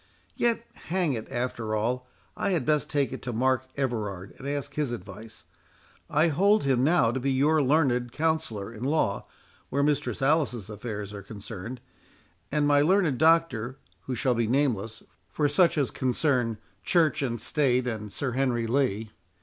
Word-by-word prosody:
Yet, 235 -1 +1 0.2
hang 175 -4 +1
it, 110 -3 -5
after 120 -4 -2
all, 125 +4 -1 0.3
I - - -1
had 160 -8 0
best 150 -1 +1
take 140 -3 0
it 130 - -6
to 125 - -4
Mark 130 +2 +1
Everard 105 -8 -3
and 135 - -7
ask 145 -1 -3
his 150 -5 -1
advice—I 115 - -5
hold 200 +8 +3
him 130 -2 +2
now 145 -6 +4
to 130 - -2
be 135 +2 0
your 150 +4 +3
learned 130 -4 +2
counsellor 150 -10 -1
in 110 +1 -8
law 135 -8 0 0.4
where 140 +1 +1
Mistress 140 -6 0
Alice's 135 - +1
affairs 105 -1 -6
are 100 - -7
concerned, 105 +3 -8 0.7
and 150 0 +2
my 145 0 +5
learned 165 -4 +3
Doctor, 160 -7 +3 0.3
who 130 - -3
shall 125 +2 +1
be 115 -1 0
nameless, 115 -4 0 0.3
for 150 - +1
such 160 +3 +3
as 135 -7 +1
concern 125 -3 0 0.3
Church 165 -6 +2
and 120 -4 -2
State 130 0 +1
and 110 -4 -4
Sir 135 +3 -3
Henry 125 -2 0
Lee. 115 -4 0
130 Hz, 160 wpm, -27 LUFS, 115-150 Hz, 0.7 s, my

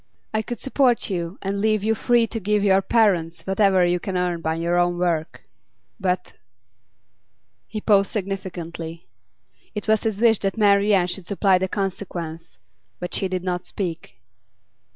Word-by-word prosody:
I 220 - +1
could 240 +2 -6
support 260 -5 +1
you 175 0 -3
and 200 +1 -2
leave 215 -1 +2
you 220 +1 +2
free 235 +1 +3
to 225 0 -4
give 210 0 +1
your 195 -1 +4
parents 185 -7 +1
whatever 190 -2 +3
you 175 0 +1
can 185 +1 -3
earn 175 -2 -1
by 160 0 -1
your 170 +1 +1
own 175 0 +1
work. 170 -3 -1 0.6
But 180 -1 -1 0.7
' 115 +1 -48
He 215 - -3
paused 200 -2 +3
significantly. 175 -5 -5 0.7
It 210 - -4
was 220 -1 +3
his 220 -3 -2
wish 225 -2 +4
that 195 +2 -2
Marian 200 -2 +4
should 180 0 -5
supply 195 -2 +3
the 190 - 0
consequence, 175 - -5 0.4
but 180 - -5
she 195 - +1
did 185 -1 -3
not 180 -1 -2
speak. 165 - -5
190 Hz, 160 wpm, -23 LUFS, 175-205 Hz, 0.7 s, your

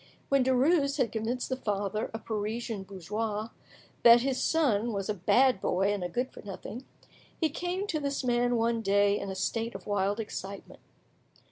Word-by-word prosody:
When 275 -1 +4
Derues 280 +3 +3
had 245 -6 +1
convinced 230 +3 -2
the 260 - 0
father, 205 -3 -2
a 225 - -4
Parisian 220 0 -3
bourgeois, 210 +4 -3 0.5
that 235 0 +8
his 260 0 -1
son 240 -8 +2
was 195 -1 -3
a - - +2
bad 245 +5 +3
boy 195 +3 +1
and 200 -3 -3
a 175 - -2
good 250 +8 -2
for - - -11
nothing, 215 +5 -8 0.5
he 320 -3 +1
came 355 +5 -2
to 330 -6 -1
this 280 -1 -2
man 245 0 +2
one 230 0 +1
day 200 0 +3
in 200 - -5
a 190 - -4
state 225 +4 -2
of 195 - -8
wild 205 +1 0
excitement. 200 -2 -7
225 Hz, 175 wpm, -29 LUFS, 205-255 Hz, 0.5 s, that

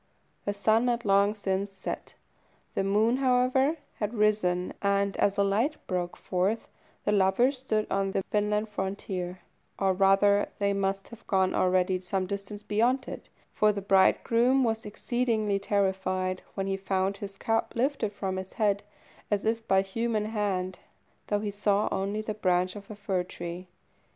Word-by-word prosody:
The 205 - 0
sun 220 +4 +3
had 235 -1 0
long 200 +1 +4
since 195 -1 -2
set. 190 -1 -6 0.6
The - - 0
moon, 215 +5 +2
however, 265 +3 +3 0.2
had 210 +2 -2
risen, 205 -4 +1
and, 200 0 +1
as 200 0 +2
a 200 - +4
light 225 +10 +1
broke 180 -2 -2
forth, 190 +5 -1 0.4
the - - +2
lovers 210 +7 +3
stood 215 -5 0
on 195 0 +1
the 195 - -1
Finland 210 +1 +1
frontier, 190 -2 -4 0.4
or 195 -1 +2
rather 195 +2 +4
they 200 0 +1
must 195 0 -1
have 235 - -13
gone 190 -1 +2
already 185 0 +2
some 185 +1 -1
distance 200 +1 -6
beyond 240 +6 +1
it, - - -8 0.2
for 215 0 +4
the 205 - -3
bridegroom 230 +7 +4
was 225 -2 -1
exceedingly 215 -2 0
terrified 190 -2 0
when 195 - -1
he 195 0 -1
found 195 0 -1
his 195 -1 -7
cap 225 +2 -1
lifted 245 -3 0
from 190 -2 -3
his 190 0 -6
head, 205 -2 +1 0.5
as 205 0 0
if 225 +1 -1
by 190 0 +4
human 215 +2 -1
hand, 200 -4 -2 0.5
though 205 0 0
he 210 -1 -2
saw 205 0 +1
only 200 +2 -1
the 215 0 -3
branch 185 -2 +1
of 200 -1 -10
a 215 - -7
fir 200 -3 -1
tree. 175 0 -7
200 Hz, 160 wpm, -28 LUFS, 190-215 Hz, 0.6 s, long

